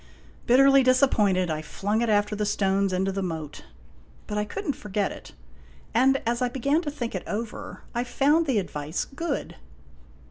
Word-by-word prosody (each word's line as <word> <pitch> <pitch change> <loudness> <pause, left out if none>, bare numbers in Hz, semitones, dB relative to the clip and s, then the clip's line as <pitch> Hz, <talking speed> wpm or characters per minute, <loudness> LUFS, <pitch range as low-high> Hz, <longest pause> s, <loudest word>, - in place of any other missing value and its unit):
Bitterly 275 +2 +6
disappointed, 215 - +3
I 155 0 -2
flung 205 +7 -2
it 235 - 0
after 205 0 +2
the 210 - -1
stones 195 -1 +1
into 190 +1 0
the 195 +1 -3
moat. 160 -5 -5 0.6
But 210 - -5
I 210 - 0
could 400 - -6
n't 285 - 0
forget 205 -1 -2
it. - - -11 0.6
And 265 +4 +4
as 235 +2 0
I 250 - +2
began 280 +5 +1
to 310 - -3
think 255 -5 -5
it 185 - -3
over, 220 +1 -5
I 240 - 0
found 290 +6 +2
the 260 -5 +2
advice 155 -4 -3
good. 330 +5 -4
220 Hz, 175 wpm, -26 LUFS, 195-265 Hz, 0.6 s, Bitterly